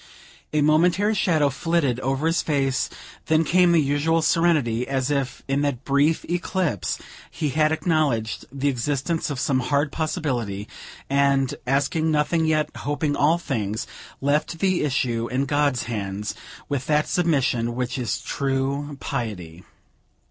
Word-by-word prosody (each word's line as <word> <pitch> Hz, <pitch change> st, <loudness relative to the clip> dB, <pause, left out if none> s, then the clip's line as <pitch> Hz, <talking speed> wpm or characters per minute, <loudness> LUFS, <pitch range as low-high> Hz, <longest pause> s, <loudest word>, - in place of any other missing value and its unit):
A 150 Hz, -, +1 dB
momentary 175 Hz, +7 st, +3 dB
shadow 160 Hz, -8 st, +2 dB
flitted 145 Hz, -5 st, 0 dB
over 135 Hz, +3 st, -1 dB
his 165 Hz, +1 st, +2 dB
face; 135 Hz, -4 st, 0 dB, 0.4 s
then 160 Hz, 0 st, +3 dB
came 175 Hz, +3 st, +4 dB
the 170 Hz, -, +5 dB
usual 150 Hz, +3 st, +1 dB
serenity, 150 Hz, -9 st, +2 dB
as 135 Hz, 0 st, -1 dB
if, 140 Hz, -2 st, -2 dB
in 135 Hz, +1 st, +1 dB
that 140 Hz, -4 st, -2 dB
brief 145 Hz, +3 st, +2 dB
eclipse, 175 Hz, -, -1 dB, 0.3 s
he 150 Hz, -, -2 dB
had 155 Hz, +3 st, +2 dB
acknowledged 150 Hz, -, 0 dB
the 140 Hz, +1 st, -2 dB
existence 140 Hz, +5 st, -1 dB
of 140 Hz, -3 st, -3 dB
some 130 Hz, 0 st, +1 dB
hard 140 Hz, +3 st, 0 dB
possibility, 120 Hz, -11 st, -2 dB, 0.4 s
and, 140 Hz, -1 st, +2 dB
asking 145 Hz, +4 st, +1 dB
nothing 155 Hz, +2 st, +1 dB
yet 155 Hz, -1 st, 0 dB
hoping 145 Hz, 0 st, -1 dB
all 155 Hz, +4 st, +3 dB
things, 110 Hz, -, -3 dB, 0.4 s
left 150 Hz, +4 st, 0 dB
the 185 Hz, +1 st, +1 dB
issue 120 Hz, -5 st, 0 dB
in 130 Hz, +3 st, -1 dB
God's 145 Hz, -2 st, +1 dB
hands, 105 Hz, -2 st, -4 dB, 0.3 s
with 140 Hz, -3 st, -3 dB
that 150 Hz, 0 st, +2 dB
submission 130 Hz, -9 st, +1 dB
which 125 Hz, +1 st, -2 dB
is 110 Hz, -3 st, -2 dB
true 140 Hz, +2 st, -2 dB
piety. 95 Hz, -, -5 dB
140 Hz, 140 wpm, -24 LUFS, 130-155 Hz, 0.4 s, the